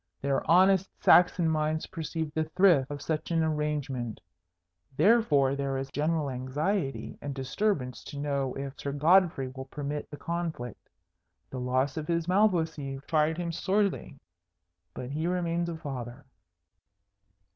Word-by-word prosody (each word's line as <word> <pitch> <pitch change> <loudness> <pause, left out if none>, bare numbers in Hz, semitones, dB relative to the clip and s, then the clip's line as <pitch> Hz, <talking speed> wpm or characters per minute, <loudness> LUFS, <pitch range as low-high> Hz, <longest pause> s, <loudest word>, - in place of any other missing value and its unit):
Their 140 0 0
honest 190 +2 +5
Saxon 175 -1 +5
minds 155 0 0
perceive 160 -1 -4
the 160 0 0
thrift 160 -5 +4
of 145 -1 -6
such 155 -1 -2
an 165 -1 +2
arrangement. 150 -7 -2 0.8
Therefore 155 - +4
there 140 -1 -2
is 135 0 -5
general 150 +1 0
anxiety 135 +5 -2
and 145 -2 -5
disturbance 135 0 -1
to 145 - -8
know 140 -2 -1
if 135 0 -5
Sir 140 - -3
Godfrey 160 -2 +3
will 130 +1 -8
permit 145 +1 -5
the 145 - -8
conflict. 165 -7 -5 0.6
The 130 - -5
loss 130 +3 0
of 155 -1 -4
his 170 -1 0
Malvoisie 165 -8 +1
tried 155 0 +1
him 175 -1 -2
sorely, 195 -4 -1 0.8
but 125 +1 -6
he 155 +3 -1
remains 170 -1 -1
a 165 - -4
father." 130 -4 -7
150 Hz, 135 wpm, -29 LUFS, 135-170 Hz, 0.8 s, honest